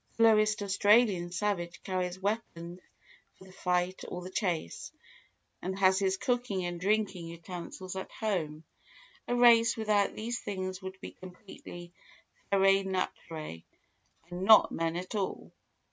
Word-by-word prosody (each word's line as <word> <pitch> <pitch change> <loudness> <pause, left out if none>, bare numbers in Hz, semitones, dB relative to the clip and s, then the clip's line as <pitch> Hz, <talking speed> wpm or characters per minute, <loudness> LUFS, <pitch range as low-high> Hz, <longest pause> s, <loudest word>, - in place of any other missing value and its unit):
The 230 - +4
lowest 215 -1 +4
Australian 205 -2 +3
savage 175 -2 -2
carries 185 -1 -2
weapons 185 -4 -3 0.6
for - - -15
the 190 - -15
fight 180 0 -1
or 180 0 -6
the 185 - -8
chase, 175 - -2 0.7
and 190 +1 -3
has 190 0 +4
his 190 -1 +1
cooking 240 -6 -1
and 175 -1 -4
drinking 195 -3 0
utensils 175 +2 -7
at 190 - -5
home; 165 -8 -2 0.6
a 245 - 0
race 235 -2 +6
without 210 -2 +1
these 235 +3 -3
things 185 -2 -4
would 190 0 -8
be - - -7
completely 180 -2 -11 0.6
ferae 195 0 +4
naturae 165 - -4 0.7
and 175 +1 -5
not 220 +2 +7
men 165 0 -1
at 180 +4 -5
all. 200 -3 -3
190 Hz, 135 wpm, -30 LUFS, 175-210 Hz, 0.7 s, not